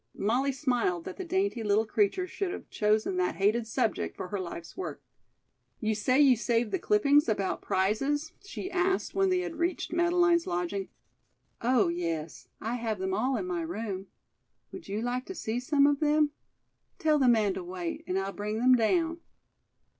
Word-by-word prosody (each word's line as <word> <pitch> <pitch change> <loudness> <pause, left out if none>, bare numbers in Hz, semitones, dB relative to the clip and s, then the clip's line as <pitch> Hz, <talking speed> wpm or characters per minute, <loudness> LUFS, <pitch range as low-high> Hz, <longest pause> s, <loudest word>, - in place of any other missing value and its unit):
Molly 250 +7 +1
smiled 245 - 0
that - - -7
the 380 - -4
dainty 375 -7 0
little 210 +1 +2
creature 215 - +1
should 370 0 -3
have - - -8
chosen 215 - +1
that 370 - 0
hated 215 +4 +1
subject 230 -1 -1
for 180 - -5
her 205 - -3
life's 170 -2 -7
work. 375 - -5 0.8
"You 220 -1 0
say 255 +6 +2
you 275 -3 +7
saved 235 -1 0
the - - 0
clippings 295 - +3
about 200 -3 -1
prizes?" 275 +11 0
she 390 -1 -6
asked 375 +1 0
when 390 0 +2
they 365 -1 +2
had 340 -3 -5
reached 340 +1 -1
Madeleine's 345 0 +3
lodging. 180 +3 -2 0.7
"Oh, 235 -6 +3
yes; 165 -2 -4
I 230 +3 -2
have 225 -3 -2
them 190 0 -2
all 250 +6 +1
in 195 - -3
my 175 -2 -2
room. 195 +3 -4 0.6
Would 350 - -9
you 210 +3 -3
like 250 +1 -2
to 380 - -6
see 225 -4 -2
some 280 +2 +3
of 285 -1 +3
them? 300 -1 +3 0.7
Tell 310 -2 +2
the 265 - +4
man 215 -5 +4
to 185 - -5
wait, 175 -1 -5
and 185 - -1
I'll 195 0 -2
bring 210 +1 -3
them 255 +3 +5
down." 330 +8 +2
240 Hz, 180 wpm, -29 LUFS, 200-320 Hz, 0.8 s, you